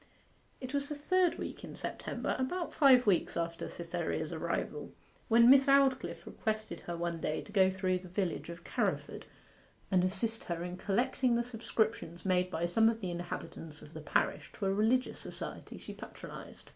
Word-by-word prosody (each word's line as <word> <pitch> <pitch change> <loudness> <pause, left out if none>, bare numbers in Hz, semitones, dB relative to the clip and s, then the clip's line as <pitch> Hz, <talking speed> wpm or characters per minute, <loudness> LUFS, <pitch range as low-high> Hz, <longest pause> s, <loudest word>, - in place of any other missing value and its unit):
It 255 0 -6
was 280 0 -1
the 295 - -3
third 360 +4 +2
week - - -6
in - - -8
September, - - -3
about 340 +7 -2
five 265 -4 +6
weeks 190 -5 +2
after 170 0 -2
Cytherea's 170 -2 -3
arrival, 170 +1 -3 0.4
when 235 0 +6
Miss 270 +2 +8
Aldclyffe 275 -1 +3
requested 220 -1 -3
her 175 -1 -3
one 170 -1 -2
day 155 - -1
to - - -13
go 190 -3 +5
through 185 -1 0
the 185 - -11
village 180 -2 -2
of 170 0 -8
Carriford - - -2 0.7
and 185 -2 +4
assist 215 +5 0
herself 170 0 -3
in 180 0 -5
collecting 245 +5 +1
the 235 - +2
subscriptions 220 -7 -2
made 180 -1 +2
by 170 -1 -1
some 220 +6 +4
of 225 -1 -2
the 185 -5 -3
inhabitants 170 -3 -6
of 150 - -13
the 160 - -7
parish 150 - 0
to 200 - -4
a 195 - +2
religious 225 +5 +2
society - - -6
she - - -8
patronized. - - -10
195 Hz, 175 wpm, -32 LUFS, 175-250 Hz, 0.7 s, Miss